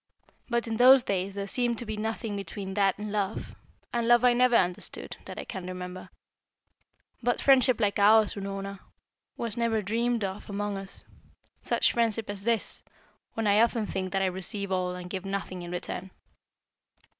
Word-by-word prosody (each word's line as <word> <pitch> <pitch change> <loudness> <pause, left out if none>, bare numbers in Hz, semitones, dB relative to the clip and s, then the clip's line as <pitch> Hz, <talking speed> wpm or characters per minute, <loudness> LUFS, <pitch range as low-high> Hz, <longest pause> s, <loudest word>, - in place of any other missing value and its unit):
But 235 0 0
in 225 -1 -2
those 255 +1 +8
days 195 -2 -2
there 200 0 -3
seemed 240 +3 0
to 240 - -2
be 215 -1 -4
nothing 220 0 -3
between 195 0 -5
that 195 -1 +2
and 210 0 -5
love, 205 0 -2 0.4
and 235 -1 0
love 240 +1 +5
I 245 - +6
never 250 0 +4
understood, 180 -4 -1
that - - -8
I - - -5
can 185 -2 -6
remember. 180 0 -7 1.1
But 245 0 +1
friendship 255 -3 +5
like 205 -2 +1
ours, 215 +1 +6
Unorna, 195 0 -5 0.6
was 230 -2 -2
never 225 -2 +1
dreamed 230 +3 0
of 195 +2 -5
among 205 0 -2
us. 195 0 -6 0.6
Such - - +2
friendship 225 -2 0
as 200 0 -7
this, 230 -2 0 0.5
when 225 - -1
I 205 +1 +5
often 230 -1 +2
think 185 -2 -3
that 195 0 +1
I - - +3
receive 190 +2 -3
all 180 -1 0
and 180 0 -7
give 185 0 -5
nothing 195 -2 -4
in 175 - -7
return." 180 +1 -5
205 Hz, 175 wpm, -28 LUFS, 195-230 Hz, 1.1 s, those